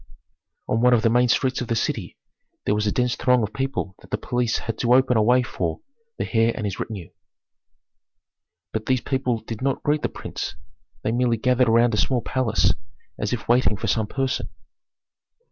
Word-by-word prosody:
On 115 Hz, -, +1 dB
one 125 Hz, 0 st, +6 dB
of 110 Hz, -, +1 dB
the 115 Hz, -, +4 dB
main 125 Hz, +1 st, +4 dB
streets 130 Hz, +2 st, +1 dB
of 125 Hz, -, -3 dB
the 115 Hz, -, 0 dB
city 110 Hz, -, -2 dB, 0.5 s
there -, -, +2 dB
was 105 Hz, 0 st, 0 dB
such -, -, +2 dB
a -, -, -1 dB
dense 125 Hz, -1 st, +1 dB
throng 125 Hz, -2 st, +3 dB
of 105 Hz, 0 st, -3 dB
people 135 Hz, -5 st, -2 dB
that -, -, -17 dB
the -, -, -1 dB
police 120 Hz, -2 st, 0 dB
had 115 Hz, -, -4 dB
to 120 Hz, 0 st, +4 dB
open 130 Hz, -1 st, +4 dB
a 110 Hz, -, +4 dB
way 125 Hz, +3 st, +4 dB
for 85 Hz, -9 st, -3 dB, 0.4 s
the -, -, -2 dB
heir 115 Hz, +1 st, +4 dB
and 110 Hz, -, -3 dB
his 100 Hz, -2 st, -3 dB
retinue. 100 Hz, -7 st, -6 dB, 1.6 s
But 110 Hz, 0 st, -3 dB
these 130 Hz, -2 st, +2 dB
people 125 Hz, -4 st, -1 dB
did 110 Hz, 0 st, -7 dB
not 135 Hz, 0 st, -1 dB
greet 150 Hz, +1 st, +1 dB
the -, -, -1 dB
prince; -, -, -6 dB, 0.5 s
they -, -, 0 dB
had 115 Hz, -, 0 dB
merely 120 Hz, -2 st, +2 dB
gathered 125 Hz, +1 st, +2 dB
around 115 Hz, +1 st, +4 dB
a -, -, +1 dB
small 125 Hz, -1 st, +1 dB
palace 125 Hz, -4 st, +2 dB, 0.5 s
as 105 Hz, -, -1 dB
if 125 Hz, -, -3 dB
waiting 120 Hz, -4 st, +3 dB
for -, -, -4 dB
some 110 Hz, -2 st, +1 dB
person. 135 Hz, +3 st, -2 dB
120 Hz, 205 wpm, -23 LUFS, 110-125 Hz, 1.6 s, one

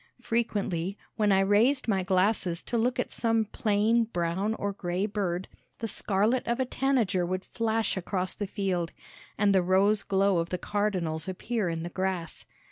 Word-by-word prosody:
Frequently, 200 Hz, -5 st, -1 dB, 0.2 s
when 210 Hz, -2 st, +2 dB
I 190 Hz, 0 st, +5 dB
raised 225 Hz, +8 st, +3 dB
my 195 Hz, -4 st, +2 dB
glasses 185 Hz, -2 st, +1 dB
to -, -, -4 dB
look 240 Hz, +2 st, +1 dB
at -, -, -1 dB
some 225 Hz, -1 st, +1 dB
plain 215 Hz, +2 st, +2 dB
brown 190 Hz, +2 st, -1 dB
or 200 Hz, -2 st, -2 dB
gray 180 Hz, 0 st, -2 dB
bird, 190 Hz, -4 st, -2 dB, 0.3 s
the 225 Hz, -, -3 dB
scarlet 210 Hz, +4 st, +1 dB
of 235 Hz, +1 st, 0 dB
a 260 Hz, -, +2 dB
tanager 245 Hz, -9 st, +1 dB
would 185 Hz, +2 st, -2 dB
flash 225 Hz, -1 st, 0 dB
across 185 Hz, 0 st, -1 dB
the 205 Hz, -, -4 dB
field, 185 Hz, -4 st, -2 dB, 0.4 s
and 205 Hz, -1 st, +3 dB
the 190 Hz, -, +5 dB
rose 195 Hz, +3 st, +3 dB
glow 195 Hz, -2 st, +2 dB
of 165 Hz, 0 st, -2 dB
the 180 Hz, -, -1 dB
cardinals 180 Hz, -5 st, -1 dB
appear 205 Hz, +1 st, -2 dB
in 165 Hz, -1 st, -3 dB
the 170 Hz, -, -4 dB
grass. 185 Hz, -3 st, -3 dB
200 Hz, 170 wpm, -28 LUFS, 185-220 Hz, 0.4 s, I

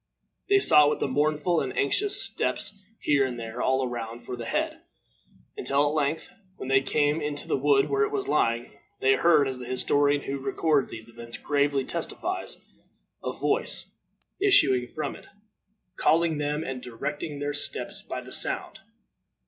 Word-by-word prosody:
They 400 Hz, -, +6 dB
sought 150 Hz, -, +6 dB
with 150 Hz, -, -1 dB
mournful 150 Hz, +5 st, +1 dB
and 130 Hz, -, -4 dB
anxious 405 Hz, -, +2 dB
steps, 205 Hz, -, +1 dB, 0.2 s
here 145 Hz, -2 st, +3 dB
and 125 Hz, -2 st, -3 dB
there, 115 Hz, +1 st, -5 dB
all 130 Hz, 0 st, +1 dB
around, 120 Hz, -1 st, -6 dB
for 125 Hz, -, -5 dB
the 120 Hz, -1 st, -7 dB
head, -, -, -2 dB, 0.7 s
until 140 Hz, +1 st, +1 dB
at -, -, -3 dB
length, 155 Hz, +1 st, -1 dB, 0.2 s
when 130 Hz, -, -7 dB
they 135 Hz, 0 st, +4 dB
came 145 Hz, +3 st, +1 dB
into 150 Hz, -1 st, -4 dB
the -, -, +1 dB
wood 140 Hz, 0 st, +3 dB
where 415 Hz, -, 0 dB
it 430 Hz, -1 st, +2 dB
was 400 Hz, -2 st, -2 dB
lying, 115 Hz, -, +1 dB, 0.3 s
they 135 Hz, 0 st, +4 dB
heard, 150 Hz, 0 st, +4 dB
as 130 Hz, -1 st, -4 dB
the 125 Hz, -, -8 dB
historian 145 Hz, +3 st, +1 dB
who 140 Hz, 0 st, -4 dB
records 140 Hz, +1 st, +1 dB
these 110 Hz, 0 st, -9 dB
events 115 Hz, 0 st, -9 dB
gravely 140 Hz, -2 st, +1 dB
testifies, 345 Hz, -, -3 dB, 0.7 s
a -, -, -2 dB
voice -, -, -1 dB, 0.5 s
issuing 135 Hz, -, +4 dB
from 155 Hz, -, -4 dB
it, -, -, -14 dB, 0.7 s
calling 165 Hz, -1 st, +2 dB
them, 150 Hz, +1 st, -1 dB
and 130 Hz, -3 st, -5 dB
directing 140 Hz, +5 st, -5 dB
their 145 Hz, +1 st, -3 dB
steps 145 Hz, -, -1 dB
by -, -, -6 dB
the -, -, -10 dB
sound. -, -, 0 dB
145 Hz, 165 wpm, -26 LUFS, 130-155 Hz, 0.7 s, They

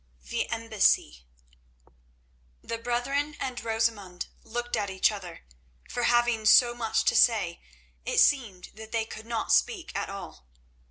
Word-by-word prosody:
The -, -, -1 dB
Embassy 210 Hz, -, +1 dB, 1.4 s
The 230 Hz, -, -4 dB
brethren 275 Hz, +5 st, -1 dB
and 250 Hz, -2 st, -4 dB
Rosamund 220 Hz, -5 st, -1 dB, 0.2 s
looked 240 Hz, +1 st, -4 dB
at 200 Hz, -, -2 dB
each 190 Hz, +2 st, +2 dB
other, 185 Hz, -5 st, -9 dB, 0.4 s
for 245 Hz, -, -2 dB
having 240 Hz, -2 st, +2 dB
so 240 Hz, +1 st, +7 dB
much 230 Hz, -2 st, -1 dB
to -, -, +3 dB
say 205 Hz, -8 st, +3 dB, 0.4 s
it -, -, -3 dB
seemed 225 Hz, -11 st, +2 dB
that 220 Hz, +1 st, -11 dB
they 225 Hz, -1 st, 0 dB
could 220 Hz, 0 st, -10 dB
not 230 Hz, -1 st, -2 dB
speak 390 Hz, -8 st, +1 dB
at 200 Hz, -, -2 dB
all. 195 Hz, -, -9 dB
225 Hz, 140 wpm, -27 LUFS, 200-240 Hz, 1.4 s, so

